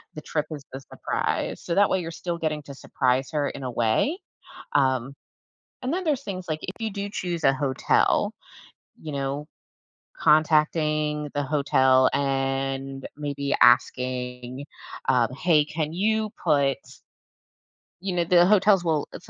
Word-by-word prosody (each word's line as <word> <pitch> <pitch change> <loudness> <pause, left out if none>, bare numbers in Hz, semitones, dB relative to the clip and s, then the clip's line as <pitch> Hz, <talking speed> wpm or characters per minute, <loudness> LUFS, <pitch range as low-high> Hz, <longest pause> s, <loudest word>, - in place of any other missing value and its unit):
The 155 - -6
trip 150 -1 -2
is 145 -2 -6
the 135 - -5
surprise. 135 - -3
So 170 - -3
that 200 +1 +4
way 190 - +1
you're 165 -1 -5
still 170 +1 -4
getting 155 -2 -2
to 140 - -10
surprise 130 -1 0
her 145 -2 0
in - - -8
a 130 - -3
way. 115 - +1 0.6
Um 130 -1 +1 0.7
and 255 +3 -2
then 370 +2 -2
there's 290 -5 0
things 185 -2 -5
like 155 -1 -2
if 185 - -5
you 220 -1 -2
do 200 0 -4
choose 175 -4 -4
a - - +6
hotel, 135 -1 +1 0.7
you 155 - -6
know, 140 +1 -3 0.7
contacting 150 -1 +2
the 145 - -1
hotel 130 -2 +3
and 135 0 -1
maybe 140 -1 -2
asking, 125 +1 +2 0.4
um, 125 -3 +3
"Hey, 150 +1 +3
can 155 0 -3
you 215 +3 0
put" 140 -5 +2 1.2
you 190 -1 -3
know, 175 - +2
the 175 +1 +5
hotels 200 -1 +4
will 160 -4 0
if - - -11
150 Hz, 150 wpm, -25 LUFS, 135-175 Hz, 1.2 s, a